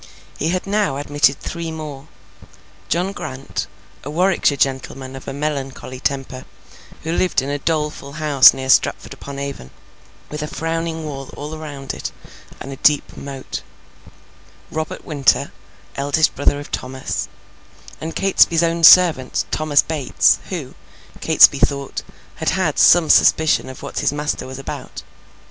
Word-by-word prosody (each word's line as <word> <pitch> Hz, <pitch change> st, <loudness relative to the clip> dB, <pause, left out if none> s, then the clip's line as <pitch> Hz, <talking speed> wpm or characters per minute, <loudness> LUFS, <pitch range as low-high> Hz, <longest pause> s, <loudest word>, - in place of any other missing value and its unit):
He -, -, 0 dB
had 180 Hz, +1 st, -1 dB
now 200 Hz, -8 st, 0 dB
admitted 145 Hz, -1 st, +1 dB
three 170 Hz, -1 st, -5 dB
more; 150 Hz, -3 st, -8 dB, 0.8 s
John 175 Hz, +7 st, 0 dB
Grant, 135 Hz, -8 st, -6 dB, 0.4 s
a 145 Hz, -, -6 dB
Warwickshire 175 Hz, -3 st, +2 dB
gentleman 130 Hz, 0 st, -2 dB
of 135 Hz, -, -10 dB
a -, -, -3 dB
melancholy 135 Hz, -3 st, -4 dB
temper, 135 Hz, -1 st, -3 dB, 0.6 s
who 160 Hz, -, -3 dB
lived 180 Hz, +1 st, +1 dB
in 135 Hz, -, -4 dB
a 145 Hz, -, -2 dB
doleful 150 Hz, -2 st, -2 dB
house 150 Hz, -3 st, +6 dB
near 130 Hz, 0 st, -6 dB
Stratford -, -, +2 dB
upon 140 Hz, 0 st, -9 dB
Avon, 140 Hz, -, -6 dB, 0.6 s
with 150 Hz, 0 st, -5 dB
a 150 Hz, -, -3 dB
frowning 165 Hz, 0 st, -3 dB
wall 135 Hz, -3 st, -7 dB
all 150 Hz, +2 st, -6 dB
round 145 Hz, -3 st, -7 dB
it, -, -, -5 dB, 0.5 s
and 135 Hz, -, -8 dB
a -, -, -9 dB
deep 150 Hz, +1 st, +2 dB
moat; 135 Hz, -1 st, -7 dB, 1.1 s
Robert 155 Hz, -1 st, -5 dB
Winter, 145 Hz, -4 st, +1 dB, 0.4 s
eldest 145 Hz, +3 st, +1 dB
brother 145 Hz, 0 st, +1 dB
of 145 Hz, -, -10 dB
Thomas; 130 Hz, +1 st, -4 dB, 0.7 s
and 160 Hz, +1 st, -5 dB
Catesby's 170 Hz, -4 st, +3 dB
own 170 Hz, 0 st, 0 dB
servant, 160 Hz, -6 st, +6 dB
Thomas 155 Hz, -2 st, +3 dB
Bates, 150 Hz, -5 st, +2 dB
who, -, -, -5 dB, 0.5 s
Catesby -, -, +6 dB
thought, 140 Hz, -1 st, -1 dB, 0.4 s
had -, -, 0 dB
had 185 Hz, -6 st, 0 dB
some 175 Hz, -2 st, +6 dB
suspicion 160 Hz, -3 st, +4 dB
of 130 Hz, -, -10 dB
what -, -, -4 dB
his -, -, +1 dB
master 150 Hz, -2 st, -3 dB
was 130 Hz, 0 st, -8 dB
about. 135 Hz, -, -7 dB
145 Hz, 145 wpm, -20 LUFS, 135-160 Hz, 1.1 s, house